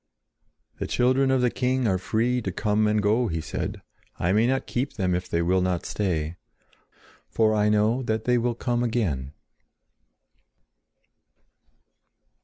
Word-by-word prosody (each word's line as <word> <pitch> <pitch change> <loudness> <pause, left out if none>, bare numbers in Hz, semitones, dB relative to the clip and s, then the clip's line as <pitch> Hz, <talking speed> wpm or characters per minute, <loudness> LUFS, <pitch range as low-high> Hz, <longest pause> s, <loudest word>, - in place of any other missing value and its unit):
"The - - -3
children 130 +2 +2
of 130 -1 +2
the 125 -1 +2
king 130 0 0
are 95 -3 +1
free 120 +6 0
to 95 - -3
come 105 +2 +1
and 105 0 +1
go," 110 +4 +2
he 80 -4 -2
said. 80 - -5 0.3
"I 85 - 0
may 110 +4 +3
not 130 +1 0
keep 130 +3 -2
them 95 -4 -1
if 90 +1 -3
they 85 0 0
will 90 +2 +2
not 90 -2 -1
stay; 85 -5 -2 0.9
for 110 -1 +2
I 105 0 +2
know 105 +4 +2
that 110 -3 -2
they 125 +1 +2
will 120 0 -1
come 120 0 -1
again." 90 - -1
110 Hz, 150 wpm, -25 LUFS, 95-125 Hz, 0.9 s, may